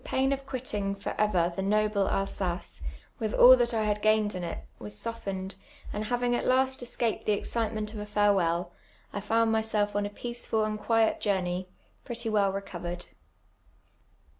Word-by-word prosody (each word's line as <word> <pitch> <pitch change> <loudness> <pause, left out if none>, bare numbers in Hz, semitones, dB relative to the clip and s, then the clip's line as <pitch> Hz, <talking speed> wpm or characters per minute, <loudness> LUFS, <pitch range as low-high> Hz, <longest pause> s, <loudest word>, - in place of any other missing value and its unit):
Tho - - -3
])nin 270 +1 +3
of 275 0 -6
quitting 215 -7 -2
for 195 - -4
over 180 -5 +2
tho 195 - -2
noble 210 0 +2
Alsnco, 185 - -2 0.4
witli 215 -1 -1
all 255 +1 +10
that 240 -1 +1
I 225 -2 0
had 210 0 0
i^aini'd 215 -1 +3
in 180 -1 -4
it, 170 - -5
was 105 0 -5
softened, 195 - -4 0.4
and 210 - -2
liavin<j; 245 +1 +1
at - - -3
last 260 +1 +3
escajud 235 -2 -2
the 210 - +3
excitement 215 0 -1
of 215 - -6
a 210 - -5
farewell, 185 -4 +2 0.4
1 205 - -4
found 225 +2 +2
niysell' 215 -2 +1
on 205 0 +1
a - - -6
peaceful 235 0 -2
and 215 0 -2
quiet 225 +1 +2
journey, 185 -2 -1 0.4
])retty 235 -1 -2
well 200 -2 +3
recovered. 175 -3 -5
210 Hz, 170 wpm, -29 LUFS, 195-230 Hz, 0.4 s, all